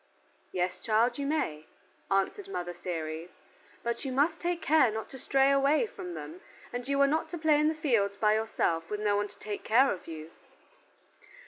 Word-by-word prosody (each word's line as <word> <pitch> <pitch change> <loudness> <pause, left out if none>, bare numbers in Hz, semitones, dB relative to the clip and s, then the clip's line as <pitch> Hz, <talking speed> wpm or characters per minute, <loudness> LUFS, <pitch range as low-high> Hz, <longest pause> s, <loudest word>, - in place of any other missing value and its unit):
"Yes, 180 0 -1
child, 235 +3 +2
you 280 - -1
may," 155 - -1 0.4
answered 195 - 0
Mother 175 - -4
Ceres, 165 -1 -5 0.5
"but 235 0 -2
you 270 - -3
must 295 +6 +2
take 350 0 -1
care 305 -6 +4
not 220 0 -5
to 265 - -9
stray 270 +2 +3
away 275 - +3
from 180 - -7
them, 155 +3 -8 0.3
and 245 +1 -4
you 280 0 +1
are 280 - +6
not 315 +3 0
to 345 - -5
play 310 -2 +3
in 300 - +3
the 315 - +1
fields 230 -10 +1
by 210 0 +3
yourself 170 -7 0
with 210 - -3
no 210 -1 +2
one 205 0 0
to 205 0 -18
take 205 0 -6
care 260 +5 +4
of 185 - -6
you." 160 0 -8
225 Hz, 195 wpm, -30 LUFS, 185-280 Hz, 0.5 s, are